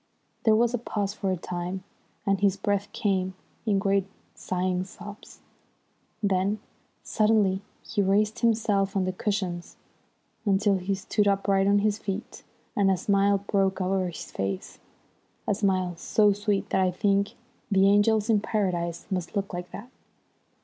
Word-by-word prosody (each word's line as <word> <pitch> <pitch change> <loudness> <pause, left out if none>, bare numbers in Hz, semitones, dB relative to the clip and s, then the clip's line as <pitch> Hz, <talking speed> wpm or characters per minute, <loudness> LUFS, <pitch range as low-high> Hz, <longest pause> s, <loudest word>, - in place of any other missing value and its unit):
There 220 -1 +6
was 235 +2 +3
a 245 - 0
pause 205 -3 -2
for 200 -2 -2
a 185 - 0
time, 180 +2 -4 0.4
and 195 -2 +2
his 200 -1 +2
breath 200 0 -1
came 190 -2 0 0.3
in 205 -2 +3
great 195 -1 +1 0.3
sighing 185 0 -1
sobs. 205 +2 -11 0.8
Then 200 +1 +1 0.4
suddenly 210 -3 +2 0.3
he 210 - 0
raised 210 +3 +2
himself 210 -4 +2
on 195 - +2
the 185 0 -1
cushions 185 -3 -3 0.7
until 200 -1 +2
he 195 +2 -1
stood 205 +2 0
upright 195 -1 +2
on 200 0 +5
his 210 0 +1
feet, 200 +2 -5 0.3
and 200 -1 +3
a 190 - +3
smile 200 +1 +2
broke 195 -2 +1
over 185 0 +1
his 175 - -7
face 95 -1 -4 0.7
a - - +3
smile 190 -3 0
so 205 +3 +3
sweet 205 0 -1
that 190 - +3
I 185 - +3
think 200 +2 +1 0.4
the 195 -1 +4
angels 205 +2 +4
in 220 -3 +4
Paradise 180 -6 -1
must 180 +1 -3
look 200 -1 -2
like 175 0 -5
that. 240 +5 -9
195 Hz, 150 wpm, -27 LUFS, 185-205 Hz, 0.8 s, There